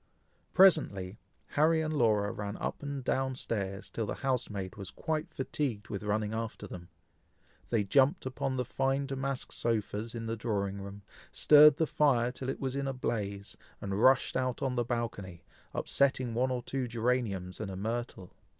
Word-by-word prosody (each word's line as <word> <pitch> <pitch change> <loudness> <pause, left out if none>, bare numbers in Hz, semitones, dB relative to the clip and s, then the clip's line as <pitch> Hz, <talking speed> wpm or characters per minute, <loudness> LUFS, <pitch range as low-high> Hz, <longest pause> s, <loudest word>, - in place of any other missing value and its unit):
Presently 110 - +4 0.3
Harry 160 +2 +3
and 155 0 -1
Laura 105 -7 +2
ran 105 -2 -5
up - - -4
and 140 -2 -4
down 130 +1 0
stairs 100 -6 -3
till 110 -2 -2
the - - -3
housemaid 105 -7 -1
was 100 -3 -5
quite 155 -2 -3
fatigued 130 -5 -3
with 100 - -4
running 105 +1 -1
after 110 -1 -4
them. 90 -3 -9 0.8
They 115 -3 +2
jumped 135 - +3
upon 130 0 -2
the 125 - 0
fine 135 +2 0
damask 135 -1 -3
sofas 115 0 -2
in 115 -1 -4
the 115 0 -2
drawing 100 -3 -2
room, 100 +1 -9 0.3
stirred 150 0 +7
the 160 +1 +1
fire 125 -6 +2
till 130 +1 -5
it - - -3
was 135 -1 -2
in 140 0 -1
a 135 - -1
blaze, 100 -5 -3 0.2
and 100 +1 -2
rushed 130 +2 +4
out 130 +1 -1
on 130 -2 0
the 120 -1 +1
balcony, 110 -7 -4 0.3
upsetting 130 -3 +1
one 125 +3 +1
or 125 -1 -2
two 130 0 -2
geraniums 115 -6 -1
and - - -4
a 95 - -5
myrtle. 115 -2 -4
120 Hz, 170 wpm, -31 LUFS, 105-135 Hz, 0.8 s, stirred